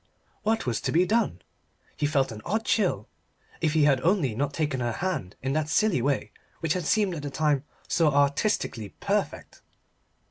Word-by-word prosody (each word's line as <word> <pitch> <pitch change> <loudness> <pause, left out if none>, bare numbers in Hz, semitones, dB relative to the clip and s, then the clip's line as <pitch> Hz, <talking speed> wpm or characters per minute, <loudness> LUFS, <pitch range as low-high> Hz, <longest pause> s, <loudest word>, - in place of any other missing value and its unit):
What 220 +1 0
was 120 -3 -1
to - - -1
be 175 +3 +4
done? 215 - 0 0.5
He 145 - 0
felt 140 -4 +1
an 110 -1 -8
odd 220 +5 -1
chill. 190 - +1 0.5
If 155 -2 +1
he 155 -2 +4
had 135 -3 +4
only 165 - +2
not 140 +5 -1
taken 145 -3 -1
her 120 -1 -1
hand 155 - -3
in 135 +1 0
that 155 0 0
silly 205 - +2
way 140 +1 0 0.3
which 160 -1 0
had 180 -3 -3
seemed 205 -2 +2
at 160 - -5
the 145 - -4
time 150 -1 +1 0.2
so 160 -3 +3
artistically 140 - 0
perfect. - - -2
150 Hz, 180 wpm, -27 LUFS, 135-180 Hz, 0.5 s, be